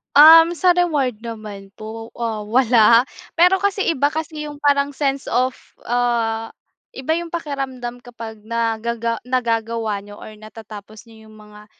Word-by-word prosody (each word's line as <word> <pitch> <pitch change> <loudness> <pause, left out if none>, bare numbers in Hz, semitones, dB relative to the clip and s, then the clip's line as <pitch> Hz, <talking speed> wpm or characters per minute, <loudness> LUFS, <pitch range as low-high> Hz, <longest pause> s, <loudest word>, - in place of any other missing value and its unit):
Um, 325 +3 +9
sa 355 +2 +2
reward 285 -10 +1
naman 210 -3 -9
po, 225 +1 -9
ah, 225 -3 -4
wala. 235 0 +5 0.3
Pero 360 +3 +4
kasi, 400 0 -1
iba 285 -2 +1
kasi 310 -1 -5
yung 290 -1 -9
parang 285 0 +2
sense 275 -1 -2
of, 255 +2 0 0.3
ah, 230 -2 -1 0.4
iba 315 +5 -2
yung 340 0 -6
pakiramdam 265 -6 -4
kapag 230 -2 -10
nagaga 230 0 -2
nagagawa 230 -3 -1
niyo 205 0 -13
or - - -9
natatapos 215 0 -12
niyo 220 -1 -16
yung 215 - -16
mga 210 0 -15
235 Hz, 140 wpm, -20 LUFS, 220-285 Hz, 0.4 s, Um